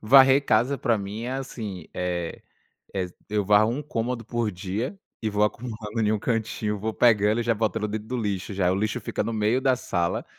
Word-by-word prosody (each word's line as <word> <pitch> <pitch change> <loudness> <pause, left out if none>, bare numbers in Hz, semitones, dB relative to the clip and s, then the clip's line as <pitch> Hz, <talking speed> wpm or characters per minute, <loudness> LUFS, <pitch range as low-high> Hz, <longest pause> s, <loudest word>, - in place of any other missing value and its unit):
Varrer 135 +4 +7
casa 140 +2 +3
pra 120 -5 +1
mim 100 +3 -5
é, 125 +2 -3
assim, 110 -10 -5
eh, 90 -2 -3 0.5
ex 90 -2 -2 0.2
eu 105 0 +1
varro 105 +2 +5
um 140 +5 -2
cômodo 120 -3 -2
por 115 -1 -1
dia 100 - -3 0.2
e 110 - 0
vou 105 0 +2
acumulando 110 0 -3
em - - +3
um 110 - +1
cantinho, 110 -2 -1
vou 110 +2 -2
pegando 110 -1 +4
e - - -2
já 115 0 +2
botando 105 -1 0
dentro 105 +1 -4
do 125 - -3
lixo 100 -3 -2
já. 90 -2 +2
O - - +1
lixo 110 +2 -1
fica - - -2
no 115 - -2
meio 110 +3 +2
da 130 -1 +3
sala, 85 -8 -1
110 Hz, 210 wpm, -26 LUFS, 105-120 Hz, 0.5 s, Varrer